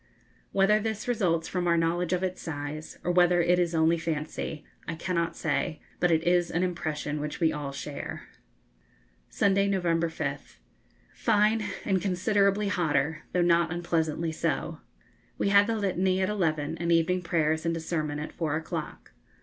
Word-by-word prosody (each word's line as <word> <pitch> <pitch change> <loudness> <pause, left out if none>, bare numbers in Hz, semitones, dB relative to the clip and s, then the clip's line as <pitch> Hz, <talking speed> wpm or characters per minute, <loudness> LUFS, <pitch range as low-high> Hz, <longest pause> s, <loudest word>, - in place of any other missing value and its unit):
Whether 195 +2 +4
this 220 0 -3
results 180 -9 +1
from 180 -1 -1
our 170 0 +3
knowledge 165 +1 0
of 180 0 0
its 185 -1 -2
size, 150 0 -6
or 175 - +1
whether 175 0 +4
it 180 +1 +3
is 170 -1 +1
only 165 +1 +3
fancy, 155 -1 -4 0.2
I 165 - -3
cannot 170 0 -1
say, 155 0 -1 0.2
but 175 - +3
it 160 -1 +2
is 175 0 +2
an 175 +2 0
impression 155 -4 -2
which 150 0 -4
we 160 -2 +3
all 145 -2 -4
share. 140 +1 -6 1.1
Sunday, 200 0 +2
November 170 -4 +1
5th. 160 - -5 0.6
Fine, 215 +1 +2 0.2
and 190 -3 +1
considerably 200 +2 +2
hotter, 155 -4 0
though 180 - +2
not 170 -1 +3
unpleasantly 165 -2 -1
so. 160 - -2 0.6
We - - +1
had 200 +1 +6
the 230 - 0
Litany 190 -2 +1
at 185 - +1
eleven, 160 -6 -1
and 170 0 0
evening 170 +2 +3
prayers 160 -2 0
and 165 0 0
a - - -3
sermon 155 -3 -2
at 150 +1 -6
four 155 -3 -1
o'clock. 160 +1 -5
170 Hz, 165 wpm, -28 LUFS, 160-185 Hz, 1.1 s, had